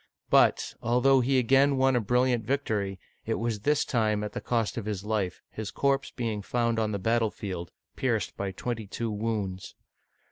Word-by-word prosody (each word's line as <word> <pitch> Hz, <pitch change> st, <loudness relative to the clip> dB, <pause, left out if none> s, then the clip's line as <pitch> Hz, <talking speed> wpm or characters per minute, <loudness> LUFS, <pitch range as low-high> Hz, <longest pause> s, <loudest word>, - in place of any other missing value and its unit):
But, -, -, +4 dB
although 125 Hz, +3 st, +4 dB
he 130 Hz, +2 st, +2 dB
again 135 Hz, +3 st, +4 dB
won 130 Hz, 0 st, +3 dB
a -, -, +4 dB
brilliant 125 Hz, +2 st, +2 dB
victory, 105 Hz, -7 st, -1 dB, 0.3 s
it 115 Hz, -, +1 dB
was 115 Hz, -2 st, -2 dB
this 145 Hz, +7 st, +2 dB
time 110 Hz, -3 st, +1 dB
at 105 Hz, -, -4 dB
the -, -, -4 dB
cost 115 Hz, -3 st, 0 dB
of 115 Hz, -, -4 dB
his 105 Hz, -3 st, -3 dB
life, 105 Hz, -5 st, -2 dB
his 110 Hz, -1 st, -5 dB
corpse 140 Hz, -1 st, 0 dB
being 115 Hz, -4 st, -3 dB
found 115 Hz, +2 st, 0 dB
on 110 Hz, -1 st, 0 dB
the 100 Hz, -, -1 dB
battlefield, 100 Hz, -4 st, -1 dB, 0.2 s
pierced 115 Hz, -5 st, -1 dB
by 100 Hz, -1 st, -3 dB
twenty 110 Hz, +2 st, -4 dB
two 115 Hz, +3 st, -3 dB
wounds. 105 Hz, -3 st, -3 dB
115 Hz, 175 wpm, -28 LUFS, 105-125 Hz, 0.3 s, But